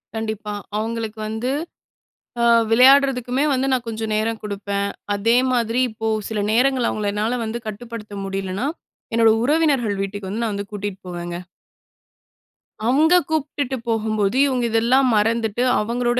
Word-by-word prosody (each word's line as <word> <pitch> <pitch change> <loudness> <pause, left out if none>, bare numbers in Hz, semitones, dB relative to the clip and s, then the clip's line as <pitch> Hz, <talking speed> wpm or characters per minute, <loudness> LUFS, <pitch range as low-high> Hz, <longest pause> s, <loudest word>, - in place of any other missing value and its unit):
கண்டிப்பா. 220 -1 -4 0.2
அவுங்களுக்கு 225 0 -3
வந்து 220 +3 -3 0.9
அ - - +4 0.3
விளையாட்றதுக்குமே 260 +1 +5
வந்து 265 0 +1
நான் 250 -2 0
கொஞ்சம் 220 -1 -3
நேரம் 220 +1 0
குடுப்பேன். 200 -1 -3 0.3
அதே 225 +4 +2 0.2
மாதிரி 235 0 +1
இப்போ 220 +1 -5 0.2
சில 220 -2 -2
நேரங்கள்ல 255 +1 +2
அவுங்கள 210 -1 -2
என்னால 220 +4 -1
வந்து 225 +1 -3
கட்டுப்படுத்த 215 0 -7
முடியலன்னா, 195 +4 -3 0.5
என்னோட 230 -1 +5
உறவினர்கள் 275 -7 +2
வீட்டுக்கு 195 0 -5
வந்து 215 +5 -3
நான் 225 -2 -1
வந்து 200 0 -5
கூட்டிட்டு 205 -2 -5
போவேங்க. 175 -1 -5 1.5
அங்க 305 +7 +4 0.2
கூப்பிட்டுட்டு 285 -4 -2
போகும்போது, 215 -1 0
இவுங்க 255 -3 0
இதெல்லாம் 245 +4 +3
மறந்துட்டு 225 +1 +1 0.2
அவங்களோட 240 +3 0
225 Hz, 130 wpm, -21 LUFS, 210-245 Hz, 1.5 s, விளையாட்றதுக்குமே